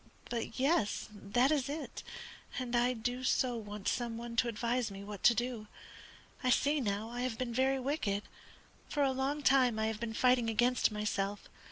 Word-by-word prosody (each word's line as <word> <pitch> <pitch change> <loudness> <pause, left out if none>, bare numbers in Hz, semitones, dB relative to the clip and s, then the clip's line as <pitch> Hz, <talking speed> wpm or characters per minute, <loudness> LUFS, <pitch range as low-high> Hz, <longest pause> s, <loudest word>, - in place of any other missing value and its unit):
But, 235 0 -3
yes, 270 -7 +1
that 230 +7 +1
is 280 -3 +1
it, 300 +2 -5 0.6
and 250 -2 -2
I 245 +1 +3
do 245 +2 -3
so 255 -1 +2
want 210 -3 -6
some 235 -2 -1
one 235 0 -6
to 240 - +4
advise 235 +1 0
me 195 0 -8
what 205 -1 -7
to 235 - +6
do. 240 -2 -2 0.8
I 255 - +2
see 285 +4 +3
now 210 0 -2
I 245 +1 -4
have 250 -3 -2
been 245 -1 -3
very 265 +2 +2
wicked. 250 -7 -1 0.7
For 290 - +1
a 270 - +3
long 275 +3 -1
time 255 -4 +4
I 220 - +1
have 220 -1 -2
been 225 -1 -4
fighting 250 -2 +3
against 240 +2 +3
myself. 205 -1 -2
240 Hz, 185 wpm, -33 LUFS, 220-255 Hz, 0.8 s, to